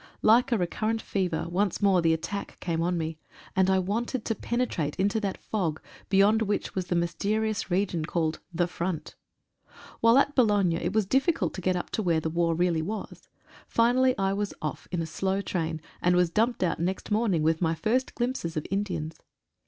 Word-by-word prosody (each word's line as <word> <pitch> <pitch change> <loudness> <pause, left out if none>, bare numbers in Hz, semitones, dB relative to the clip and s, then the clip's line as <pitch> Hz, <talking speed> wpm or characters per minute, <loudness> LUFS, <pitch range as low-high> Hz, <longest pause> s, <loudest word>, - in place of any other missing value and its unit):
Like 240 +4 +5
a 235 - +3
recurrent 215 +5 -1
fever, 185 -6 -1
once 185 +2 0
more 195 -3 +4
the 165 -1 +3
attack 180 +5 -3
came 165 -2 -1
on 175 +1 0
me, 160 -1 -3 0.4
and 190 0 +3
I 190 - +4
wanted 220 +6 -2
to 225 - 0
penetrate 220 -11 -2
into 205 +3 +2
that 200 -3 -2
fog, 170 -8 -2 0.3
beyond 205 +3 +4
which 210 -1 -1
was 185 -1 -3
the 175 - 0
mysterious 205 +5 -1
region 180 -3 0
called 160 -1 -1
"The 175 +1 +1
Front." 175 -1 -4 0.9
While 230 +2 +5
at 280 +1 +3
Boulogne 205 -8 +3
it 190 - -2
was 215 -2 +2
difficult 275 - +1
to 185 - -6
get 185 +1 +1
up 180 - -4
to - - -1
where 170 -5 +2
war 165 +1 0
really 170 -1 +1
was. 210 +6 -6 0.4
Finally 250 +2 +3
I 195 0 +1
was 205 0 -2
off 155 -3 -5
in 175 -2 -1
a - - -3
slow 190 +4 -1
train, 165 -5 -2 0.2
and 180 0 +3
was 180 -1 +3
dumped 230 +3 +1
out 175 - 0
next 185 +5 -2
morning 210 -7 +2
with 160 +2 +2
my 165 -1 +1
first 240 +8 0
glimpses 240 -10 -2
of 155 - -2
Indians. 175 -6 -2
190 Hz, 190 wpm, -27 LUFS, 170-215 Hz, 0.9 s, Like